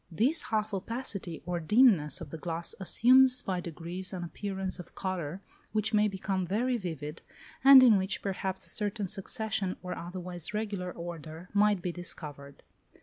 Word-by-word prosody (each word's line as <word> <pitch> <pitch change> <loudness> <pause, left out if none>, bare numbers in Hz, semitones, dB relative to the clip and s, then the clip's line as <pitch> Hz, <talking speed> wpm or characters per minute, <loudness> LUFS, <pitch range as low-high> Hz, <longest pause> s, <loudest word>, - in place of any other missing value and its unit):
This 245 - +2
half 215 -1 -1
opacity 195 -4 -3
or 175 -1 -2
dimness 185 - +4
of - - -8
the 160 - -5
glass 170 +1 -4
assumes 255 +6 +5
by 185 -2 -2
degrees 175 +3 -5
an 180 -2 -4
appearance 190 +1 -4
of 180 - -11
colour 185 -2 -4 0.3
which 215 +1 +1
may 210 0 +4
become 190 -2 -2
very 240 +7 +1
vivid, 160 - -5 0.4
and 270 -1 +10
in 225 -6 +6
which 190 +1 -2
perhaps 190 -1 -3
a - - -9
certain 205 -1 -1
succession, 195 0 -2
or 180 0 -4
otherwise 180 +1 -4
regular 200 -4 -3
order, 170 0 -8
might 205 -3 +3
be 180 - -1
discovered. 145 -5 -7
190 Hz, 155 wpm, -30 LUFS, 175-210 Hz, 0.4 s, and